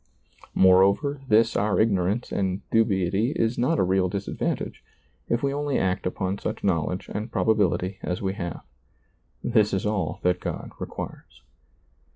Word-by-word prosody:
Moreover, 100 +10 +4
this 115 +1 +4
our 105 0 +1
ignorance 105 +1 +1
and 95 -1 -2
dubiety 105 +2 +2
is 115 +1 0
not 135 +7 +2
a - - +3
real 95 0 +2
disadvantage, 100 +2 -3 0.5
if 120 +2 0
we 140 0 +1
only 145 -1 -1
act 95 0 0
upon 95 +1 -2
such - - -4
knowledge 90 -1 0
and 110 +3 -4
probability 95 -3 +1
as 90 - -2
we 95 -1 -1
have. 85 -5 -5 0.8
This 110 -4 +3
is 95 - -2
all 105 -6 -1
that 90 0 +2
God - - -5
requires. - - -8
100 Hz, 145 wpm, -25 LUFS, 95-115 Hz, 0.8 s, Moreover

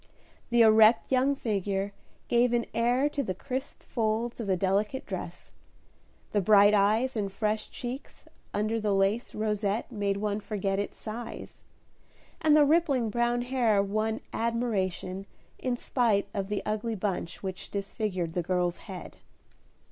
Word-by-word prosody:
The 240 -1 +5
erect 220 +2 +6
young 265 +2 +3
figure 200 -4 -2 0.3
gave 240 0 +3
an 235 -1 +1
air 245 +4 +2
to 290 - -2
the 185 -8 -3
crisp 260 +6 -5
folds 225 +1 -1
of 225 - -4
the 190 -1 +2
delicate 205 +8 0
dress; - - -7 0.8
the 205 - +2
bright 205 +1 +6
eyes 215 +6 +3
and 200 -3 -1
fresh 215 +1 -1
cheeks 255 +1 -7 0.3
under 215 +2 0
the 205 -2 +1
lace 195 +5 +1
rosette 210 +1 -1
made 200 -3 -1
one 205 0 -1
forget 200 -2 -2
its 205 - -4
size; 230 +2 -7 0.8
and 305 -1 +5
the 295 - +6
rippling 280 -7 +2
brown 240 +1 +1
hair 240 -5 +2
won 215 +2 -1
admiration 200 -5 -1 0.3
in 250 -2 -1
spite 230 -6 +1
of 195 -2 -2
the 205 0 -2
ugly 215 +2 -2
bunch 190 -4 -3
which 190 -1 -5
disfigured 200 -4 -3
the 175 - 0
girl's 175 0 0
head. 190 -4 -9
215 Hz, 145 wpm, -28 LUFS, 200-240 Hz, 0.8 s, erect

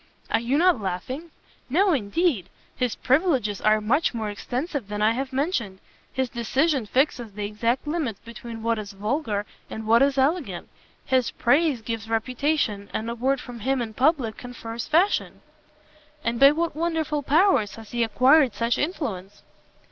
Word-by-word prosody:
"Are 225 - +3
you 240 +5 0
not 345 -7 +4
laughing?" 230 - -4 0.4
"No, 370 +7 +3
indeed; 235 - 0 0.3
his 250 -3 -1
privileges 260 - +1
are 215 0 +4
much 240 +6 +1
more 215 -2 -2
extensive 255 - -4
than 210 0 -4
I 215 +1 +4
have 265 +3 -3
mentioned: 260 - -1 0.3
his 260 -1 -1
decision 260 +2 0
fixes 245 -3 0
the 205 0 -4
exact 230 +6 -1
limits 295 - -2
between 230 -1 -8
what 230 -1 +1
is 205 -1 -7
vulgar 210 0 -2 0.2
and 220 - -6
what 230 +3 +5
is 275 0 +3
elegant, 270 - 0 0.4
his 260 -2 +2
praise 280 -1 +2
gives 225 -1 -4
reputation, 230 -2 -1
and 225 +2 -2
a - - -2
word 265 +3 +1
from 245 -2 -9
him 265 +4 0
in 225 -2 -4
public 260 -3 +1
confers 235 -2 -7
fashion!" 345 +6 +1 0.8
"And 230 0 -1
by 275 - +9
what 330 0 -1
wonderful 320 -2 -1
powers 295 - +3
has 225 -2 -12
he 240 -1 +1
acquired 255 +4 +4
such 235 +1 0
influence?" 205 - -4
245 Hz, 160 wpm, -25 LUFS, 220-290 Hz, 0.8 s, by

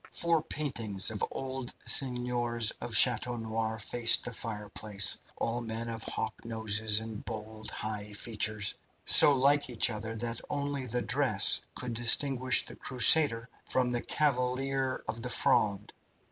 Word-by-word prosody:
Four 170 -2 0
paintings 115 -11 -2
of 105 - -5
old 130 -1 -7
seigneurs 120 -3 +3
of 115 - -5
Chateau 125 0 +4
Noir 110 -1 -4
faced 115 +2 +3
the 125 - -6
fireplace, 105 -2 -1 0.2
all 120 +1 -3
men 115 0 -6
with 115 - -9
hawk 110 - -6
noses 110 -1 0
and 110 -1 -9
bold, 110 0 -7
high 105 -1 -7
features, 105 -1 -1 0.3
so 145 - +7
like 140 +1 +1
each 120 0 0
other 110 +1 -7
that 115 +1 -4
only 140 -2 -4
the 125 +1 -3
dress 125 -6 +2
could 125 -2 -6
distinguish 125 +2 +3
the - - -11
Crusader 125 -2 +4 0.2
from 125 -1 -2
the 120 -1 -2
Cavalier 135 -1 -2
of 115 - -6
the 125 - -5
Fronde. 105 -3 0
115 Hz, 140 wpm, -29 LUFS, 110-130 Hz, 0.3 s, so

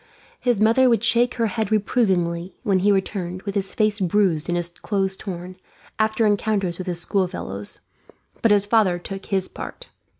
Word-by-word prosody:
His 245 -5 +1
mother 230 +4 +5
would 230 -2 +2
shake 240 +1 +3
her 230 - +1
head 220 0 -2
reprovingly 185 -5 +1
when 195 -2 +2
he 205 +3 +3
returned, 190 -2 -2
with 200 - -4
his 195 -1 -1
face 215 -1 +1
bruised 180 -4 +1
and 175 - +1
his 175 0 -1
clothes 190 +2 -2
torn, 185 -2 -7 0.4
after 220 +1 +2
encounters 205 -4 0
with 185 - -5
his 175 -1 -2
schoolfellows; 175 - -2 0.6
but 230 - +4
his 205 -1 +4
father 205 -4 +3
took 195 +2 -8
his 190 -2 +1
part. - - -9
195 Hz, 170 wpm, -23 LUFS, 180-220 Hz, 0.6 s, mother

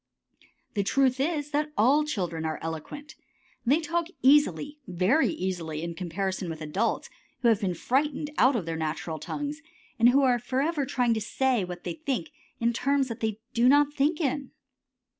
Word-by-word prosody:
The 205 - +1
truth 260 +5 +2
is 295 0 -1
that 300 +1 0
all 275 +8 +4
children 180 - -3
are 160 -1 -2
eloquent. 165 - -6 0.5
They 285 +6 +5
talk 335 +1 -1 0.2
easily, 290 +1 +3
very 185 - +2
easily, 175 - -3
in 170 0 -3
comparison 185 +1 -3
with 160 -1 -5
adults 160 +9 -1 0.4
who 235 - +6
have 225 -1 +3
been 185 -3 -1
frightened 290 - 0
out 260 +1 +5
of 205 -8 -1
their 165 -1 -3
natural 155 0 -3
tongues, 295 - -4 0.4
and 235 +2 +7
are 260 -3 +4
forever 275 +4 -1
trying 245 -4 +2
to 220 - -2
say 250 +1 +1
what 180 -1 -7
they - - -3
think 305 0 -3 0.3
in 235 0 +1
terms 275 +2 +1
that 230 0 -5
they 220 -1 -2
do 240 +2 +4
not 290 +1 +4
think 295 +4 +1
it - - -1
in. 275 0 -2
245 Hz, 175 wpm, -27 LUFS, 185-290 Hz, 0.5 s, and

